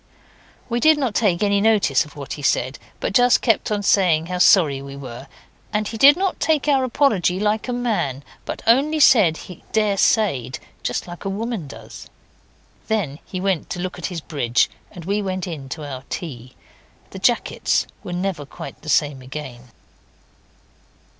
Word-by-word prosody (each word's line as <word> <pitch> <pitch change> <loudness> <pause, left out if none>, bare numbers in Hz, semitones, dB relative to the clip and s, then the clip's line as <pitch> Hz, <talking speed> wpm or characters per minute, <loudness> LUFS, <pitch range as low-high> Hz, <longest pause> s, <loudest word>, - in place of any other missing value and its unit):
We 235 -1 -1
did 310 +4 +5
not 260 -7 -1
take 205 -5 +1
any 200 -1 +2
notice 205 -11 +3
of 150 - -16
what 140 -2 -6
he 145 - -7
said, 130 -1 0 0.2
but - - -2
just 245 +2 +4
kept 225 -2 +1
on 205 -1 -1
saying 175 -6 +3
how 180 +1 -4
sorry 155 -8 +5
we 140 0 -9
were; 130 -1 -9 0.4
and 210 -1 -1
he 225 - -6
did 280 +7 +7
not 385 0 -1
take 310 -3 +1
our 275 -3 +3
apology 220 - +1
like 210 +3 0
a - - -2
man, 215 - -1 0.2
but - - -6
only 280 +7 +3
said 210 - +5
he 180 - -11
daresayed, 200 - +1 0.2
just - - -2
like 175 -1 -9
a 195 - -2
woman 210 -4 -4
does. - - -11 0.8
Then 185 -10 -1
he 185 - -5
went 190 -3 -1
to - - -4
look 180 0 -4
at 175 - -3
his 175 -4 -5
bridge, 125 -7 0 0.2
and 170 -2 -11
we 200 +3 0
went 185 -1 -3
in 150 -7 -7
to 150 +1 -6
our 130 -2 -7
tea. 130 -7 -7 0.6
The - - -8
jackets - - +1 0.2
were - - -7
never 175 -3 -2
quite 165 +4 -10
the 155 - -8
same 145 -4 +1
again. 130 -2 -8
185 Hz, 175 wpm, -21 LUFS, 145-220 Hz, 0.8 s, did